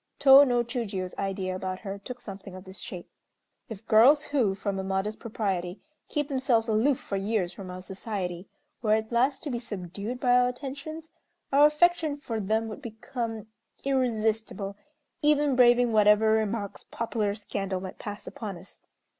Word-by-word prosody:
Tô 275 0 +9
no 245 -3 +2
Chiûjiô's 210 -7 -4
idea 190 -1 -2
about 185 0 -4
her 200 -1 -5
took 245 +5 -8
something 195 -3 -9
of 185 - -9
this 190 0 -11
shape: 180 -2 -7 0.6
"If 220 -1 -8
girls 265 +8 +6
who, 225 -9 +2
from 200 -1 -3
a - - -2
modest 195 +3 -2
propriety, 195 -5 -3 0.3
keep 295 -2 -1
themselves 260 -5 +1
aloof 230 +5 +2
for 195 - -4
years 195 -3 -1
from 190 0 -9
our 180 0 -7
society, 190 -2 -5 0.3
were 215 -2 +3
at 220 +1 -3
last 260 +4 +1
to 295 - -3
be 240 - -2
subdued 205 +1 -6
by 245 -1 +3
our 250 0 +5
attentions, 285 +5 -7 0.4
our 290 +2 +8
affection 315 -1 +2
for 230 -6 -4
them 220 +2 0
would 215 - -7
become 225 -1 -5 0.4
irresistible, 220 -6 0 0.5
even 295 -2 +3
braving 245 -1 +5
whatever 210 0 +5
remarks 220 -2 -1
popular 215 -3 -2
scandal 195 -2 -3
might 185 0 -8
pass 205 -1 -7
upon 205 -5 -6
us. 185 +3 -15
220 Hz, 165 wpm, -27 LUFS, 195-250 Hz, 0.6 s, Tô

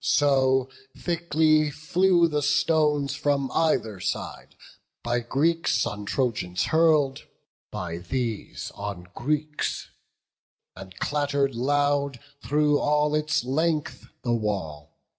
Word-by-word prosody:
So 135 -2 +3 0.3
thickly 155 -3 +2 0.2
new 180 -2 +5
the 150 -2 -1
stones 150 -1 +2
from 140 -2 0
either 115 - +1
side, - - -5 0.5
By 120 +1 0
Greeks 155 +8 +1
on 105 0 -5
Trojans 100 -7 -1
hurl'd, 155 -2 +2 0.4
by 85 -1 -5
these 110 +5 -4
on 100 -3 -7
Greeks; 150 +3 -2 0.8
And 95 -1 -11
clatter'd 140 -2 0
loud 140 +1 0 0.2
through 150 +3 +2
all 150 0 +1
its 155 -1 +1
length 155 +3 -1 0.2
the 120 - 0
wall. 95 -10 -3
140 Hz, 105 wpm, -25 LUFS, 120-150 Hz, 0.8 s, new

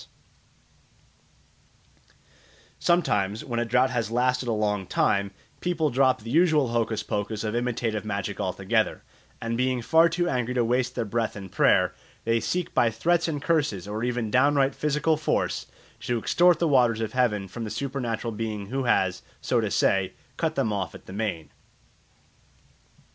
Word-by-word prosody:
Sometimes, 105 - +1
when 120 -2 -2
a 120 - 0
drought 130 +3 +2
has 115 -4 -1
lasted 125 +1 +1
a - - +1
long 105 -3 -1
time, 100 +2 +1 0.3
people 165 -4 0
drop 130 -3 +2
the 115 - -6
usual 155 -4 +3
hocus 115 -2 -1
pocus 105 +1 -3
of 110 -1 -2
imitative 120 -2 -1
magic 100 -3 -4
altogether, - - 0 0.4
and 115 0 -3
being 130 0 +1
far 165 +5 +5
too 175 +1 0
angry 125 -4 -1
to 120 -2 +2
waste 125 +2 0
their 115 - -1
breath 115 +2 -2
in 95 -2 -8
prayer - - +3 0.3
they 115 0 +2
seek 180 +8 -2
by 120 - +3
threats 170 +10 +1
and 145 -3 -3
curses 145 - 0
or 105 +2 -4
even 120 -3 -1
downright 140 +1 +3
physical 150 +2 +1
force 155 - -1 0.3
to 120 - -1
extort 175 +8 +4
the 170 - +1
waters 125 -6 +3
of 110 -1 -3
heaven 110 -6 +1
from 115 +5 -7
the 110 - -4
supernatural 125 -3 -3
being 105 -2 -4
who 135 +1 -2
has, 95 -6 +1 0.2
so - - +1
to - - -1
say, 95 -1 +1 0.2
cut - - -1
them 110 - 0
off 100 -2 -3
at - - -13
the 95 - -10
main. 95 -7 -3
120 Hz, 160 wpm, -26 LUFS, 110-135 Hz, 0.4 s, far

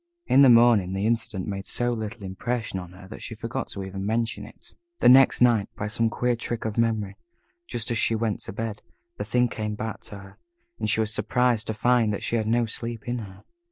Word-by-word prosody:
In 135 - +5
the 135 - +8
morning, 115 -6 +5
the 95 +2 -1
incident 110 -4 -1
made 95 -1 -5
so 120 0 0
little 110 -1 -5
impression 110 +2 -3
on 90 -1 -10
her, 90 +1 -13
that - - -9
she - - -7
forgot - - -4
to 100 - -6
even 95 0 -6
mention 115 +2 -2
it. - - -17 0.2
The - - +3
next 130 +1 +7
night, 120 -5 +4
by 100 - -3
some 115 +1 0
queer 120 +2 0
trick 115 0 -4
of 110 -2 -2
memory, 110 -4 0 0.5
just 120 +2 -2
as 115 - +1
she 115 - +2
went 110 -2 -1
to - - -6
bed, 110 +1 -5 0.4
the - - -3
thing 125 0 +2
came 105 -2 -4
back 110 +1 -5
to 100 - -8
her, 100 -1 -13 0.4
and - - -1
she 110 - +2
was 110 0 0
surprised 125 -1 +1
to 110 - -1
find 120 -1 +2
that 100 - -4
she - - 0
had 110 -2 0
no 120 +1 +2
sleep 115 0 -6
in 120 0 -2
her. 95 -3 -10
110 Hz, 230 wpm, -25 LUFS, 100-120 Hz, 0.5 s, the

